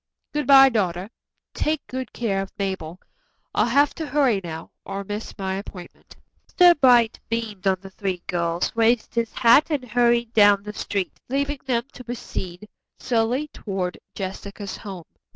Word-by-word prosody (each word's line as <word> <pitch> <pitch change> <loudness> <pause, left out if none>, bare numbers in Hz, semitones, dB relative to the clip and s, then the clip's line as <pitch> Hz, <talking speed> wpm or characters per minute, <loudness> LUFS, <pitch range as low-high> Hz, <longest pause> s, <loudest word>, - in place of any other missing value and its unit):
Good 295 -3 -1
bye, 270 -1 +9
daughter. 190 -3 -1 0.4
Take 305 -1 -1
good 260 -3 -5
care 200 -5 -1
of 195 - -7
Mabel. 190 -4 -4 0.5
I'll - - +2
have 280 +4 +3
to 320 -2 -5
hurry 265 -8 +2
now, 165 -1 -7
or 200 0 -5
miss 205 +2 -6
my 190 -2 -2
appointment." 190 -3 -11 0.4
Mr. 350 -4 +7
Bright 240 -4 +5
beamed 220 -4 -3
on 190 -1 +3
the 195 -1 -11
three 190 -2 -4
girls, 170 0 -1
raised 230 0 +2
his 230 -2 -1
hat 240 +5 +5
and 295 -5 -1
hurried 235 0 +2
down 205 -2 +5
the 210 0 -7
street, 200 -2 -3
leaving 280 +2 -1
them 235 -2 +1
to 250 - -10
proceed 210 -5 -6 0.3
slowly 245 +4 0
toward 190 -7 -4 0.2
Jessica's 200 +1 -6
home. 190 -5 -8
220 Hz, 155 wpm, -23 LUFS, 195-250 Hz, 0.5 s, bye